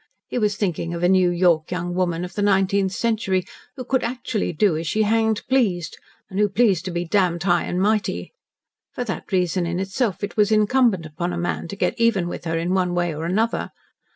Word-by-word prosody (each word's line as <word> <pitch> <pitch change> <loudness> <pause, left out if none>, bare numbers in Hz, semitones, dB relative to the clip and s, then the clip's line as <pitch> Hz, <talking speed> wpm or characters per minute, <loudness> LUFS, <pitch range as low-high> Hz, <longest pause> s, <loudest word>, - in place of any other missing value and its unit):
He - - -2
was 210 -2 0
thinking 175 -4 -2
of 170 - -4
a - - +5
New 185 -1 +4
York 175 -3 +2
young 175 0 -3
woman 175 -1 -1
of 180 - -10
the 205 - -3
nineteenth 195 -1 +2
century 195 -4 0 0.3
who 255 - -7
could 260 +1 0
actually 235 -4 -2
do 175 +1 +2
as 160 +1 -3
she 215 +6 +1
hanged 220 0 +1
pleased, 195 - 0 0.3
and 190 - -5
who 210 0 +3
pleased 195 -4 +2
to 185 - -3
be 175 0 -2
damned 175 -2 +1
high 175 -2 +2
and 180 - -2
mighty. 210 +2 0 0.6
For 245 - -2
that 200 -7 -6
reason 180 -1 +1
in 175 +1 -2
itself 195 +2 -2
it 205 - -4
was 210 -1 +3
incumbent 215 -4 +3
upon 170 +3 -4
a - - -3
man 175 0 -2
to 200 - -6
get 200 - -1
even 230 -7 +2
with 175 - -6
her 165 0 -1
in 170 +3 -1
one 180 -2 +1
way 175 -2 0
or 155 +2 -5
another. 220 +7 0
185 Hz, 215 wpm, -22 LUFS, 175-215 Hz, 0.6 s, a